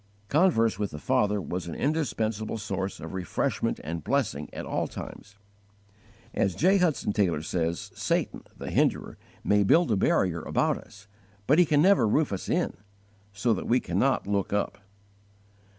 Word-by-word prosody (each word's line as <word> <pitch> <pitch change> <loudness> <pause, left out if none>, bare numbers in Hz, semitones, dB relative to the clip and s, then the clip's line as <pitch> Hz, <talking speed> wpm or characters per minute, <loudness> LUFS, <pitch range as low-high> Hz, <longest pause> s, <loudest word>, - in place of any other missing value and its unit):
_ - - -34
Converse 140 - +3
with 105 -2 -1
the 75 - -8
Father 105 +6 +1
was 90 -2 -4
an 85 - -5
indispensable 115 -8 -1
source 100 -2 -4
of 80 - -8
refreshment 95 -1 -1
and 80 +1 -5
blessing 85 - -1
at - - -6
all - - -1
times. 100 0 -9 1.0
As 95 - 0
J. 190 - +4
Hudson 160 - +1
Taylor 90 -7 +1
says 85 0 -2
"Satan, - - -1 0.2
the - - -6
Hinderer, - - 0 0.2
may 105 0 +3
build 160 - +4
a - - +3
barrier 90 -3 +1
about - - 0
us, 95 -2 -16 0.4
but 150 - +4
he 175 - +5
can 145 0 +4
never 195 - +5
roof 145 +3 +1
us 95 - -5
in, - - 0 0.6
so 105 +4 +1
that - - -4
we 125 +2 +3
cannot 135 +1 +1
_look 100 -1 -1
up." 100 0 -1
105 Hz, 165 wpm, -27 LUFS, 95-135 Hz, 1.0 s, he